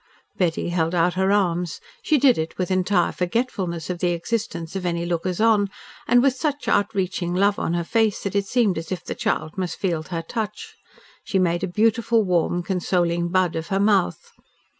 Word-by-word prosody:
Betty 175 -2 0
held 170 0 0
out 175 +1 +2
her 190 +2 +1
arms. 180 -4 0 0.2
She 305 - +2
did 260 - +4
it 160 +1 -4
with 185 0 -2
entire 185 -1 +2
forgetfulness 180 -4 -2
of 180 -1 -4
the 175 0 +1
existence 170 -2 -3
of 190 - -3
any 170 -1 -1
lookers 175 +1 -2
on, 215 -3 +3 0.4
and 245 0 +5
with 275 -2 +4
such 290 +2 -3
outreaching 185 -3 0
love 200 +2 +2
on 170 - -1
her 170 - 0
face 220 +3 +1
that 200 - -3
it 200 -1 +1
seemed 210 -7 +2
as 165 - -9
if 185 - -4
the - - -3
child 210 -7 -2
must 180 -2 -3
feel 170 -5 -1
her 165 +1 -5
touch. 210 +4 -5 0.5
She 195 - -1
made 175 -1 +1
a - - 0
beautiful, 225 +3 +2
warm, 175 -1 +1
consoling 175 -2 0
bud 185 -1 +1
of 160 0 -3
her 195 - 0
mouth. 200 - +1
185 Hz, 190 wpm, -23 LUFS, 170-205 Hz, 0.5 s, and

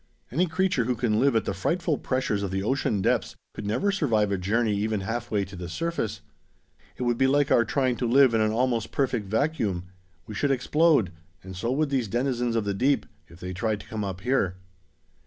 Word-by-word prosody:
"Any 175 +9 +2
creature 170 -7 +1
who 125 +1 0
can 110 -2 +1
live 135 -2 +3
at 110 -2 +2
the - - -1
frightful 165 - -1
pressures 130 -6 -1
of 100 - -2
the 95 +1 -2
ocean 110 -4 0
depths - - +1 0.2
could 105 - -6
never 200 - +1
survive 115 - +1
a 100 - +1
journey 105 +3 +1
even 105 0 -1
halfway 110 0 -2
to 95 +1 -11
the 90 -1 -6
surface. 115 - -3 0.8
It - - -3
would 120 -1 0
be 130 - +4
like 145 +1 +2
our 120 - +5
trying 130 +1 0
to 120 - -1
live 130 0 +5
in 110 - +3
an 110 0 +2
almost 120 -1 0
perfect 125 -7 -1
vacuum. 110 - 0 0.4
We 110 - -8
should 140 +8 0
explode, 140 - +3 0.3
and 95 0 -9
so 115 +7 -2
would 150 +1 0
these 130 -5 0
denizens 120 +1 -1
of 110 -2 0
the 100 - 0
deep, 135 +8 +1 0.2
if 85 +1 -16
they 90 0 -5
tried 110 +2 -1
to - - -15
come 110 -1 -4
up 95 -2 -5
here. 105 -6 +1
115 Hz, 210 wpm, -26 LUFS, 100-135 Hz, 0.8 s, our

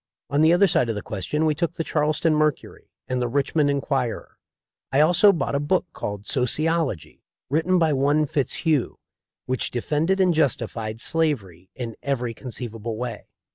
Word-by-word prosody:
On 145 +2 +2
the 160 +1 +6
other 175 +3 +5
side 125 -9 +2
of 115 - -1
the 105 - -5
question 110 - -2
we 155 - +3
took 165 +2 -2
the 165 - -2
Charleston 155 +1 +1
Mercury 155 -2 -1 0.2
and 130 -1 -1
the 120 - 0
Richmond 145 +3 +1
Enquirer. 135 -4 -2 0.5
I 135 - +2
also 175 +6 +6
bought 170 - -2
a 140 - +1
book 165 +6 +1
called 100 0 -5
"Sociology," 150 - 0 0.3
written 165 +5 +2
by 160 -3 +3
one 145 +3 +2
Fitzhugh, 145 0 -1 0.5
which 130 -1 -1
defended 155 +10 0
and 185 -2 +4
justified 115 -7 -1
slavery 110 - -1
in 115 -3 -5
every 125 -4 -2
conceivable 115 -2 -6
way. 120 -2 -5
140 Hz, 160 wpm, -24 LUFS, 120-160 Hz, 0.5 s, the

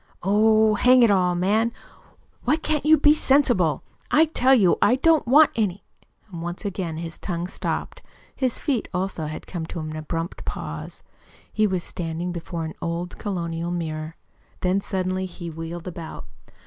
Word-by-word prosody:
"Oh, 215 +2 +4
hang 250 +3 +5
it 230 - +5
all, 180 -2 +2
man, 210 +6 +2 0.7
why 270 +5 +3
can't 310 -2 -1
you 315 0 +7
be 295 +1 +6
sensible? 260 - +3 0.3
I 315 +2 +5
tell 265 -4 +3
you 190 -8 +3
I 245 - +5
don't 315 +1 +3
want 290 +4 +6
any 200 -4 -1 0.3
" 215 - -33
Once 175 +4 -6
again 180 -5 -3
his 165 0 -6
tongue 175 -2 -3
stopped. 185 - -4 0.3
His 255 -3 -1
feet, 270 -7 -1
also, 180 -4 -2
had 155 - -7
come 165 -3 -5
to 170 - -6
an 155 0 -5
abrupt 165 +3 -4
pause. - - -6 0.5
He 215 -1 +3
was 185 -3 -2
standing 170 +1 -4
before 170 -1 -5
an 160 - -6
old 170 +1 -4
colonial 170 -4 -3
mirror. 160 -2 -4 0.5
Then 185 +2 +1
suddenly 185 -1 -2
he 170 -1 -8
wheeled 165 +2 -7
about. 165 -2 -7
185 Hz, 160 wpm, -24 LUFS, 170-225 Hz, 0.7 s, you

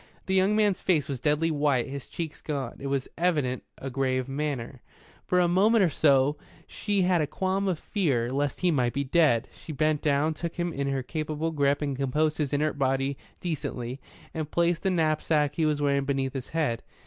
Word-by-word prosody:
The 190 - -1
young 190 +2 +3
man's 210 -3 +2
face 160 -7 +2
was 135 -3 -4
deadly 150 +5 +1
white, 145 -5 +1
his 140 -1 -7
cheeks 160 -3 -6
gaunt. 140 -6 -4
It 140 - -4
was 135 -1 -1
evidently 150 -8 0
a 135 - -6
grave 130 -1 0
matter. 135 -3 -3 0.5
For 180 - +3
a 175 - +4
moment 200 +5 +4
or 175 - +2
so 140 0 +3 0.3
she 205 -3 -1
had 180 -2 +3
a 150 - 0
qualm 190 +5 -1
of 180 -4 0
fear 135 - 0
lest 140 0 -1
he 180 -1 +3
might 125 -5 +1
be 140 - 0
dead. 140 -5 +3
She - - -10
bent 155 +1 +1
down, 150 +1 +2
took 165 +2 -5
him 175 -1 -2
in 140 0 -2
her 135 -1 -1
capable 155 +3 -3
grip 145 -1 +1
and 140 -2 -1
composed 150 +4 0
his 145 -3 0
inert 150 0 0
body 135 +1 +1 0.3
decently, 140 -6 -4 0.3
and 155 -2 -3
placed 170 0 +1
the 190 - +1
knapsack 155 -3 +1
he 160 0 +1
was 150 -1 0
wearing 140 -1 +2
beneath 135 -1 -1
his 130 -2 -5
head. 150 -8 -1
150 Hz, 200 wpm, -27 LUFS, 135-165 Hz, 0.5 s, a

